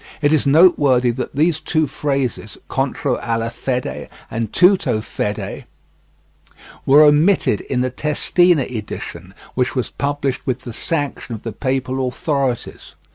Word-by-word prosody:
It 145 Hz, 0 st, +2 dB
is 150 Hz, -2 st, +2 dB
noteworthy 140 Hz, -6 st, +5 dB
that 125 Hz, +2 st, -5 dB
these 160 Hz, +2 st, +2 dB
two 155 Hz, 0 st, 0 dB
phrases, 135 Hz, -6 st, -3 dB
"contro 135 Hz, -1 st, -1 dB
alla 115 Hz, 0 st, -2 dB
fede" 120 Hz, -, -4 dB, 0.2 s
and 115 Hz, -2 st, -3 dB
"tutto 180 Hz, -, +3 dB
fede," 105 Hz, -1 st, -4 dB, 1.2 s
were 145 Hz, +3 st, +7 dB
omitted 150 Hz, -, +3 dB
in 125 Hz, -2 st, -2 dB
the 130 Hz, 0 st, -1 dB
Testina 155 Hz, +3 st, +2 dB
edition, 100 Hz, -6 st, -7 dB, 0.2 s
which 125 Hz, +1 st, -1 dB
was 125 Hz, -, -2 dB
published 140 Hz, -2 st, -2 dB
with 130 Hz, -1 st, -1 dB
the 120 Hz, -3 st, -8 dB
sanction 145 Hz, -4 st, -3 dB
of 110 Hz, -, -11 dB
the 115 Hz, -, -5 dB
papal 130 Hz, 0 st, -1 dB
authorities. 135 Hz, -1 st, -3 dB
130 Hz, 130 wpm, -19 LUFS, 120-150 Hz, 1.2 s, were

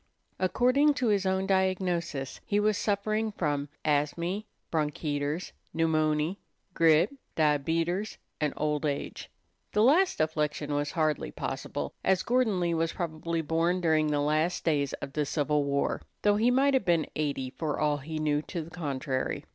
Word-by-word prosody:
According 255 Hz, +10 st, +3 dB
to 250 Hz, -3 st, +1 dB
his 200 Hz, -2 st, +2 dB
own 190 Hz, 0 st, +1 dB
diagnosis, 185 Hz, -7 st, 0 dB
he 205 Hz, -, +1 dB
was 210 Hz, 0 st, +2 dB
suffering 215 Hz, +2 st, 0 dB
from 145 Hz, -7 st, -1 dB, 0.2 s
"asmy, 170 Hz, +7 st, 0 dB, 0.3 s
bronketers, 150 Hz, 0 st, -1 dB, 0.2 s
pneumony, 155 Hz, +1 st, +1 dB, 0.4 s
grip, 165 Hz, -, +4 dB, 0.2 s
diabeters, 165 Hz, +6 st, +1 dB, 0.2 s
and 150 Hz, -2 st, +1 dB
old 150 Hz, -1 st, 0 dB
age." 145 Hz, -2 st, -3 dB, 0.4 s
The 210 Hz, -, +4 dB
last 340 Hz, +10 st, +4 dB
affliction 150 Hz, -1 st, -1 dB
was 145 Hz, 0 st, -1 dB
hardly 155 Hz, -3 st, 0 dB
possible, -, -, -4 dB
as 190 Hz, -1 st, +2 dB
Gordon 240 Hz, -6 st, +2 dB
Lee 170 Hz, -1 st, +1 dB
was 165 Hz, 0 st, 0 dB
probably 165 Hz, -1 st, -2 dB
born 165 Hz, +4 st, +1 dB
during 160 Hz, -3 st, +2 dB
the 145 Hz, -1 st, +1 dB
last 155 Hz, +4 st, +1 dB
days 145 Hz, -4 st, +1 dB
of 135 Hz, -, -6 dB
the 150 Hz, -, +1 dB
Civil 150 Hz, 0 st, 0 dB
War, 140 Hz, 0 st, 0 dB, 0.2 s
though 205 Hz, 0 st, +4 dB
he 230 Hz, +3 st, +3 dB
might 270 Hz, +3 st, +3 dB
have 265 Hz, -, +3 dB
been 170 Hz, -3 st, +3 dB
eighty, 140 Hz, -4 st, -2 dB
for 155 Hz, 0 st, -3 dB
all 150 Hz, -1 st, +2 dB
he 155 Hz, +3 st, -6 dB
knew 150 Hz, -1 st, +1 dB
to 170 Hz, +1 st, -5 dB
the 165 Hz, -, -12 dB
contrary. 140 Hz, -5 st, -3 dB
160 Hz, 155 wpm, -29 LUFS, 150-190 Hz, 0.4 s, grip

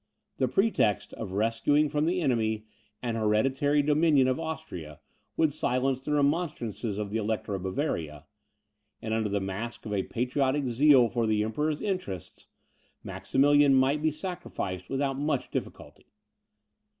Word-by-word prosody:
The 130 Hz, -, +2 dB
pretext 130 Hz, -, +1 dB
of 100 Hz, -4 st, -6 dB
rescuing 115 Hz, +8 st, +2 dB
from 150 Hz, +1 st, 0 dB
the 180 Hz, +1 st, +1 dB
enemy 110 Hz, -6 st, 0 dB, 0.4 s
an 120 Hz, -2 st, -1 dB
hereditary 130 Hz, +7 st, +2 dB
dominion 150 Hz, -2 st, +4 dB
of 130 Hz, +2 st, 0 dB
Austria, 160 Hz, -, -6 dB, 0.4 s
would 155 Hz, -3 st, +2 dB
silence 130 Hz, -1 st, 0 dB
the 150 Hz, -, -2 dB
remonstrances 140 Hz, -, -1 dB
of 105 Hz, -1 st, -3 dB
the 110 Hz, -, 0 dB
Elector 110 Hz, -1 st, -2 dB
of 95 Hz, -, -3 dB
Bavaria, 85 Hz, -, -3 dB, 0.7 s
and, 110 Hz, -, -4 dB
under 110 Hz, -1 st, 0 dB
the 100 Hz, 0 st, 0 dB
mask 100 Hz, +6 st, -5 dB
of 105 Hz, -, -4 dB
a 100 Hz, -, +1 dB
patriotic 130 Hz, +5 st, 0 dB
zeal 130 Hz, 0 st, +5 dB
for 115 Hz, 0 st, -1 dB
the 105 Hz, -1 st, +2 dB
Emperor's 150 Hz, +8 st, -1 dB
interests, 180 Hz, -, -4 dB, 0.6 s
Maximilian 145 Hz, 0 st, +3 dB
might 135 Hz, +3 st, +3 dB
be 155 Hz, -, +3 dB
sacrificed 150 Hz, -, -5 dB
without 135 Hz, 0 st, -1 dB
much 145 Hz, -3 st, -1 dB
difficulty. -, -, -6 dB
130 Hz, 140 wpm, -28 LUFS, 110-145 Hz, 0.7 s, zeal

